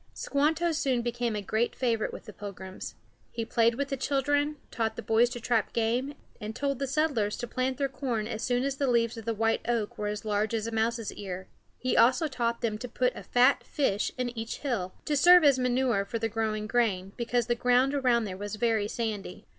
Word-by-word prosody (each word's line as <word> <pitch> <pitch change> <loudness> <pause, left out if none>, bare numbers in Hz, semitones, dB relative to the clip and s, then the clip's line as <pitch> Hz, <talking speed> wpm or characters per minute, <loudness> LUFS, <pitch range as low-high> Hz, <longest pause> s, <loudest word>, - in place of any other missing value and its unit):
Squanto 315 +4 +1
soon 265 -6 0
became 240 -1 -1
a 205 - -3
great 220 +4 0
favorite 230 -4 0
with - - -9
the 210 - -10
Pilgrims. 190 -2 -8 0.3
He 230 -1 -4
played 230 0 +2
with 280 +2 -2
the 275 - -1
children, 285 +3 +1 0.2
taught 225 -2 -1
the - - -6
boys 230 +2 +3
to 245 -1 -6
trap 230 -2 0
game, 240 +5 0 0.2
and 215 +1 -6
told 275 -2 -1
the 275 - -1
settlers 270 -7 0
to 240 - -4
plant 255 +2 -1
their 280 - +1
corn 250 -5 -2
as 220 -1 -4
soon 245 0 +1
as 275 0 -1
the 275 - 0
leaves 235 -1 +2
of 225 -2 -8
the 230 - 0
white 225 +1 +1
oak 230 -3 -1
were 210 - -1
as 210 +1 -4
large 215 +1 0
as 220 -1 -2
a 230 - -3
mouse's 225 0 -1
ear. 190 -2 -7 0.3
He 255 - -1
also 260 +7 +5
taught 235 -4 -2
them 220 -3 -1
to 250 - -5
put 250 +1 0
a - - -7
fat 250 +3 +3
fish 215 -8 0
in 245 -1 -2
each 225 0 -5
hill, 220 -10 -2
to 300 - 0
serve 355 +4 +7
as 280 -3 +5
manure 250 -4 +1
for 200 +4 -4
the 225 0 -1
growing 215 -1 -1
grain, 210 -5 0
because 240 0 0
the 240 - +1
ground 250 +3 +3
around 250 -4 +2
there 195 -3 -4
was 205 +2 -5
very 220 -2 +1
sandy. 210 -5 -4
235 Hz, 220 wpm, -28 LUFS, 220-260 Hz, 0.3 s, serve